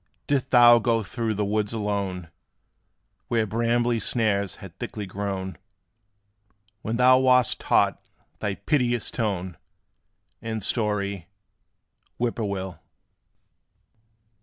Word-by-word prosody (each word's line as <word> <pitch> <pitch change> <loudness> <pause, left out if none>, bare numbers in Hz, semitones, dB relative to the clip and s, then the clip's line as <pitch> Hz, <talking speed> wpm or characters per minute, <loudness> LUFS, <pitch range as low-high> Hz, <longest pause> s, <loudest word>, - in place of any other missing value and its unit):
Didst 135 -2 0
thou 120 -1 +7
go 115 -1 +1
through 115 +1 -3
the 105 +1 -1
woods 105 +1 -1
alone, 100 -5 -3 1.0
Where 115 -2 +1
brambly 115 +2 +1
snares 100 -5 0
had - - -12
thickly 105 - -5
grown 95 -1 -4 1.2
When 115 +2 -2
thou 130 +1 +6
wast 125 -2 +3
taught - - +2 0.4
thy 100 -1 -2
piteous 120 -6 0
tone 95 -6 -2 0.8
And 110 -2 -4
story, 100 -5 -1 0.9
"Whip 120 -1 -1
poor 115 - -1
will?" 95 -4 -4
110 Hz, 105 wpm, -25 LUFS, 100-120 Hz, 1.2 s, thou